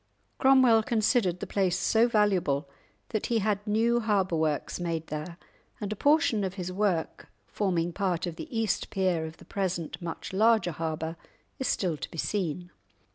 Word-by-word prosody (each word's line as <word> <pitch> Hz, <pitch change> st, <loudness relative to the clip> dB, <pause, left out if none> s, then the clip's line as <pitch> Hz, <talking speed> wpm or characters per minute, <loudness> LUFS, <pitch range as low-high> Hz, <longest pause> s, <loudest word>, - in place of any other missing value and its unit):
Cromwell 260 Hz, -4 st, +6 dB
considered 215 Hz, -5 st, +1 dB
the -, -, -2 dB
place 185 Hz, -3 st, 0 dB
so 225 Hz, +5 st, +3 dB
valuable 190 Hz, -, +1 dB, 0.4 s
that 215 Hz, -, -2 dB
he 235 Hz, -, +1 dB
had 210 Hz, -1 st, +1 dB
new 230 Hz, +3 st, +2 dB
harbour 200 Hz, -6 st, +1 dB
works 155 Hz, 0 st, -1 dB
made 165 Hz, -2 st, -2 dB
there, 155 Hz, +3 st, -6 dB, 0.4 s
and 205 Hz, 0 st, -3 dB
a -, -, -8 dB
portion 285 Hz, -5 st, +3 dB
of 190 Hz, -1 st, -3 dB
his 185 Hz, -2 st, -4 dB
work, 190 Hz, -4 st, -1 dB, 0.2 s
forming 175 Hz, -, -1 dB
part 180 Hz, -3 st, -1 dB
of 175 Hz, -2 st, -5 dB
the -, -, -8 dB
east 220 Hz, -2 st, -1 dB
pier 185 Hz, -4 st, 0 dB
of 160 Hz, -, -11 dB
the -, -, -16 dB
present 185 Hz, -5 st, -3 dB
much 170 Hz, +2 st, -6 dB
larger 215 Hz, -2 st, +3 dB
harbour, 160 Hz, 0 st, -4 dB, 0.4 s
is 265 Hz, -, -1 dB
still 175 Hz, -5 st, 0 dB
to -, -, -6 dB
be -, -, -10 dB
seen. 175 Hz, -1 st, -2 dB
190 Hz, 170 wpm, -28 LUFS, 170-215 Hz, 0.4 s, Cromwell